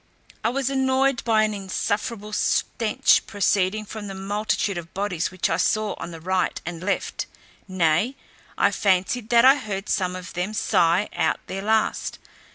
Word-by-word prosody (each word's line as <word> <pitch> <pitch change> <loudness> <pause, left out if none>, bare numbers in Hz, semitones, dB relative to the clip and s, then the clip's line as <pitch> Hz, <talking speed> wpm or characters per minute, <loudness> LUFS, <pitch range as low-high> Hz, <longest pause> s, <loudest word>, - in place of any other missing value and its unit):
I 225 - +2
was 270 +2 -1
annoyed 265 -1 +2
by 220 -2 +3
an 215 0 0
insufferable 205 +2 -3
stench 215 +1 +2
proceeding 205 +1 +1
from 210 0 -7
the 195 - -6
multitude 200 -1 -1
of 170 0 -12
bodies 185 -4 -1
which 185 -1 -1
I 165 - 0
saw 215 +3 +1
on - - -5
the 165 -1 -9
right 185 +2 0
and 170 -1 -5
left; 195 +2 -2 0.4
nay, 185 - +1 0.4
I - - +3
fancied 200 +4 +1
that 235 0 +6
I 270 +2 +8
heard 205 -6 -5
some 185 -2 0
of 180 0 -8
them 180 +5 -3
sigh 175 +1 +2
out 165 -2 0
their 195 - -5
last. 220 +2 0
205 Hz, 165 wpm, -24 LUFS, 185-220 Hz, 0.4 s, I